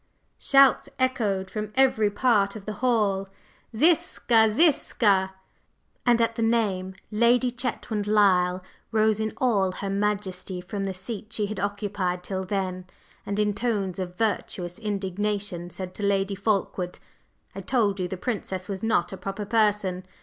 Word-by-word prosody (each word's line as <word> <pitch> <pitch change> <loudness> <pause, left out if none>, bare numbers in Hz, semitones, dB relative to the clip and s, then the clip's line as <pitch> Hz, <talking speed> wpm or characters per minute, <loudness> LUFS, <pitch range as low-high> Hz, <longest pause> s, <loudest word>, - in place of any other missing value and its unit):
Shouts 275 -1 +5
echoed 215 -8 0
from 215 -1 -4
every 255 -6 +3
part 205 -2 +2
of 205 -2 -9
the 215 - -4
hall: 205 -6 +1 0.5
"Ziska! 235 -6 +3
Ziska!" 210 - +2 0.7
And 240 -1 +5
at 230 0 +2
the 230 - -4
name 205 -5 0 0.2
Lady 240 +3 +3
Chetwynd 230 -3 -2
Lyle 185 -3 +3 0.3
rose 220 -1 +2
in 220 0 -1
all 200 -7 +2
her 195 +1 -4
majesty 195 -2 -2
from 195 +2 -4
the 190 -1 -3
seat 210 +3 -6
she 220 -2 -1
had 205 -1 -5
occupied 200 -3 -2
till 190 0 -3
then, 185 -2 -3 0.4
and 200 - -2
in 210 -1 +2
tones 205 -5 -2
of 180 -1 -5
virtuous 185 -3 -2
indignation 200 -3 -2
said 185 0 -7
to - - -8
Lady 200 0 +1
Fulkeward: 195 -3 -1 0.6
"I - - -6
told 210 -6 +1
you 180 - -1
the 190 - -5
Princess 190 -4 -3
was 195 -2 -5
not 220 -6 +1
a - - -6
proper 195 +2 -5
person! 205 -4 +1
205 Hz, 150 wpm, -26 LUFS, 190-220 Hz, 0.7 s, Shouts